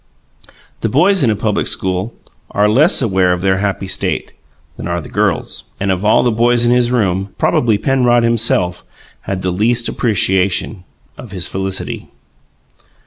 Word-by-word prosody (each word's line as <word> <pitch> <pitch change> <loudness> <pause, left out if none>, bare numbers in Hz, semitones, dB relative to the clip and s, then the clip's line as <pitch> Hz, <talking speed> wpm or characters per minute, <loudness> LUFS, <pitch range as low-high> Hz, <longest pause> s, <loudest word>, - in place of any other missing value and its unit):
The 115 - -1
boys 180 - +3
in 130 - +3
a 110 - +1
public 105 0 -1
school 95 +4 -2 0.3
are 105 +1 +2
less 135 - +3
aware 95 -5 +2
of 90 0 -1
their 95 0 +1
happy 100 -1 -2
state 95 - -2 0.4
than - - -6
are - - -1
the - - -9
girls; - - -1
and 100 0 0
of 95 +1 -2
all 105 - +4
the 120 - +2
boys 120 +1 +2
in 120 - +3
his 125 0 +2
room, 95 -5 -1
probably 115 -4 +2
Penrod 120 -1 +2
himself 110 -6 +1 0.5
had 95 -1 -3
the 90 - 0
least 115 +6 +1
appreciation 95 -3 0 0.3
of 120 - -9
his 95 -3 -4
felicity. 95 0 -4
105 Hz, 160 wpm, -16 LUFS, 95-120 Hz, 0.5 s, all